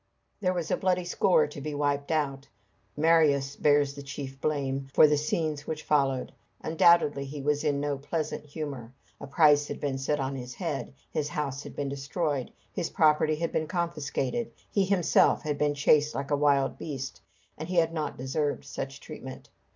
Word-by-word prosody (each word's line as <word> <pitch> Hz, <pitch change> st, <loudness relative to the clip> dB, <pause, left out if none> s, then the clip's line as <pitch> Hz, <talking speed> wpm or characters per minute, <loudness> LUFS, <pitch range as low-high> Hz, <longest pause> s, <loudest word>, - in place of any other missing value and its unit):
There 185 Hz, -3 st, 0 dB
was 170 Hz, -3 st, -3 dB
a -, -, +2 dB
bloody 185 Hz, -1 st, +1 dB
score 180 Hz, +1 st, +3 dB
to 145 Hz, -1 st, -8 dB
be 150 Hz, +1 st, -4 dB
wiped 145 Hz, -1 st, 0 dB
out. 140 Hz, -3 st, -1 dB, 0.5 s
Marius 150 Hz, -3 st, +3 dB
bears 145 Hz, -1 st, +3 dB
the 140 Hz, -, -8 dB
chief 140 Hz, -1 st, -7 dB
blame 135 Hz, -3 st, -1 dB
for -, -, +8 dB
the 150 Hz, 0 st, +4 dB
scenes 150 Hz, 0 st, -2 dB
which 155 Hz, -1 st, -4 dB
followed. 135 Hz, -3 st, +1 dB, 0.3 s
Undoubtedly 160 Hz, -3 st, +4 dB
he 140 Hz, +2 st, -7 dB
was 145 Hz, +1 st, 0 dB
in 145 Hz, -2 st, +1 dB
no 145 Hz, -1 st, -2 dB
pleasant 155 Hz, +2 st, -3 dB
humor. 140 Hz, -5 st, -6 dB, 0.3 s
A -, -, -8 dB
price 145 Hz, 0 st, +4 dB
had -, -, -5 dB
been 135 Hz, -2 st, -2 dB
set 145 Hz, +2 st, 0 dB
on 135 Hz, 0 st, -2 dB
his 125 Hz, -1 st, -7 dB
head, 165 Hz, -7 st, -3 dB, 0.2 s
his 150 Hz, -1 st, -1 dB
house 140 Hz, -2 st, -3 dB
had -, -, -10 dB
been 140 Hz, -1 st, -2 dB
destroyed, 140 Hz, 0 st, -2 dB, 0.2 s
his 165 Hz, -, -2 dB
property 155 Hz, 0 st, +3 dB
had 165 Hz, +2 st, -2 dB
been 155 Hz, -, -1 dB
confiscated, 170 Hz, -, -2 dB, 0.2 s
he 200 Hz, -2 st, +2 dB
himself 185 Hz, -3 st, +3 dB
had 150 Hz, -1 st, -2 dB
been 145 Hz, -1 st, +1 dB
chased 150 Hz, +1 st, +3 dB
like 140 Hz, +2 st, -4 dB
a -, -, +4 dB
wild 140 Hz, -2 st, +2 dB
beast, 135 Hz, -4 st, -6 dB, 0.3 s
and 155 Hz, +3 st, -7 dB
he 185 Hz, -, -2 dB
had 165 Hz, -1 st, +3 dB
not 155 Hz, -3 st, -3 dB
deserved 145 Hz, +3 st, -2 dB
such 135 Hz, +1 st, -6 dB
treatment. 130 Hz, -4 st, -9 dB
145 Hz, 180 wpm, -28 LUFS, 140-155 Hz, 0.5 s, for